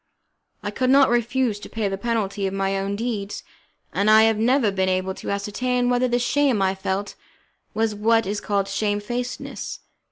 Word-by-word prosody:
I - - -3
could 255 -1 0
not 270 -1 +5
refuse 240 -2 +1
to - - -10
pay 220 -2 -2
the 195 - -2
penalty 200 -2 -1
of 190 - -4
my 195 0 0
own 195 +1 -2
deeds, 210 -2 -4 0.5
and 200 +2 +2
I 220 0 +7
have 225 -1 +3
never 240 -1 +3
been 190 -1 0
able 185 0 0
to - - -7
ascertain 245 +5 0
whether 245 +1 +2
the 240 0 +1
shame 260 -1 +2
I 190 -1 +2
felt 190 +1 -3 0.6
was 220 0 +1
what 225 +2 +2
is 205 +2 -3
called 200 -1 0
shamefacedness. 210 +5 -3
215 Hz, 180 wpm, -23 LUFS, 195-240 Hz, 0.6 s, I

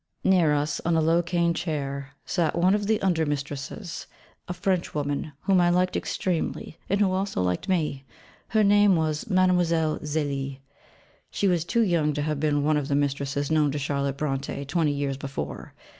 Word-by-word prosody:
Near 180 -5 +4
us, 145 0 -1
on 170 0 +1
a - - +4
low 165 +2 +3
cane 170 -1 +1
chair, 140 -5 -4
sat 170 -3 0
one 180 +3 +4
of 205 -1 0
the 220 0 +2
under 175 -4 +2
mistresses, 145 +5 -4 0.4
a 180 - -3
Frenchwoman, 155 -6 -2
whom 190 -2 +3
I 175 - +4
liked 180 +1 +2
extremely, 170 -2 -2
and 200 - +1
who 200 -3 +3
also 190 - -1
liked 90 - -2
me: 155 -7 0 0.4
her 220 -1 +2
name 205 -1 +5
was 155 0 -1
Mlle. 175 -4 +2
Zélie 140 -3 -2 0.7
she 200 - 0
was 175 -4 +2
too 175 +8 +1
young 165 -6 +1
to 145 0 -2
have 150 -1 -2
been 145 -1 +1
one 155 +1 +2
of 145 -2 -2
the 140 - 0
mistresses 140 0 -1
known 150 -2 +3
to - - -2
Charlotte 140 -1 -2
Brontë 140 -1 -3
twenty 155 +1 +1
years 140 -1 -2
before. 140 0 -6
155 Hz, 175 wpm, -26 LUFS, 145-180 Hz, 0.7 s, name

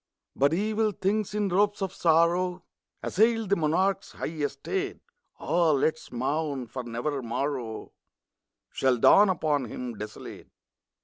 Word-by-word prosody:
But 140 +2 +3
evil 215 +4 0
things, 210 +2 -1
in 205 -2 0
robes 205 +3 +2
of 195 -2 -3
sorrow, 175 +1 +2 0.4
Assailed 225 0 +2
the - - +6
monarch's 180 +4 0
high - - -5
estate. 160 - -3 0.4
(Ah, 170 -2 +2
let 145 +3 +2
us 160 - -16
mourn! 140 +2 -2
for 125 +3 -6
never 120 +5 -3
morrow 120 -1 -4 0.8
Shall 130 -2 +1
dawn 200 - +6
upon 155 -6 0
him 120 +1 -6
desolate 105 0 -9
160 Hz, 130 wpm, -27 LUFS, 135-195 Hz, 0.8 s, the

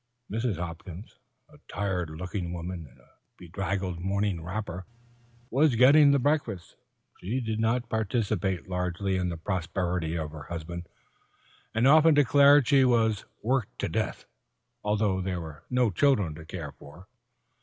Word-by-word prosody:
Mrs. 110 -3 -1
Hopkins, 90 +3 -8 0.3
a 150 -1 -19
tired 95 -5 -2
looking 90 +2 -5
woman 85 -1 -6
in - - -22
a - - -25 0.3
bedraggled 95 0 -3
morning 95 -1 -1
wrapper, 90 0 -5 0.6
was 140 -1 +3
getting 140 +5 +7
the 140 - +5
breakfast. 130 - -1 0.4
She 110 +9 -2
did 110 -3 -3
not 115 +2 +1
participate 105 -4 -1
largely 90 +1 -2
in 90 -1 0
the 85 - -4
prosperity 85 -1 -2
of 80 -2 -4
her 75 -2 -9
husband, 85 +1 -6 0.9
and 115 +3 +3
often 155 +2 +6
declared 145 0 +6
she 140 -2 +5
was 115 -4 +2 0.2
"worked 125 -1 -1
to - - -2
death," - - -2 0.6
although 105 -2 +1
there 90 -1 -2
were 80 -3 -9
no 125 -3 +2
children 100 - +2
to 80 +1 -11
care 80 -3 -6
for. 80 +7 -15
95 Hz, 145 wpm, -28 LUFS, 85-120 Hz, 0.9 s, getting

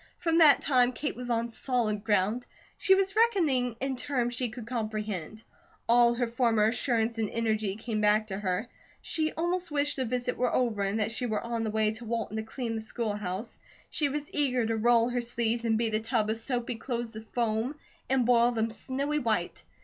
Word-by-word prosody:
From 330 -1 +1
that 305 -3 +7
time, 250 -3 +3
Kate 290 +6 -3
was 245 0 -6
on 230 0 +1
solid 230 -3 +1
ground. 215 +2 +1 0.3
She 385 - +4
was 390 +1 0
reckoning 320 - +2
in 270 0 -2
terms 245 -2 -1
she 245 0 -1
could 235 0 -8
comprehend. 215 -4 -4 0.4
All 235 0 +5
her 245 0 0
former 230 -2 +2
assurance 230 -2 0
and 215 -2 0
energy 220 -3 -1
came 220 0 -3
back 210 +1 +4
to 195 -2 -5
her. 195 +3 -1 0.4
She 315 -1 0
almost 350 +2 -1
wished 290 -1 0
the 260 - 0
visit 245 +1 -2
were 250 -1 +1
over, 235 -5 +1
and 200 +2 0
that 215 +1 0
she 245 +2 -3
were 215 -2 -2
on 235 -1 -2
the 220 - -1
way 215 0 +1
to 220 +2 -8
Walton 225 -1 -3
to - - -1
clean 230 +1 -4
the 220 - -3
school 220 -1 -3
house. 205 +2 -5 0.3
She 295 -2 +1
was 290 +1 -5
eager 255 -5 +1
to 225 0 0
roll 235 +1 +3
her 245 0 -1
sleeves 235 0 -1
and 225 -1 +2
beat 225 -1 0
a 215 - +2
tub 220 -1 0
of 225 - -1
soapy 240 0 -1
clothes 235 -1 -4
to 220 - -8
foam, 225 +3 -1 0.3
and 260 -2 +2
boil 240 0 +5
them 225 -1 -1
snowy 280 +6 -2
white. 215 -9 -1
235 Hz, 205 wpm, -29 LUFS, 220-250 Hz, 0.4 s, that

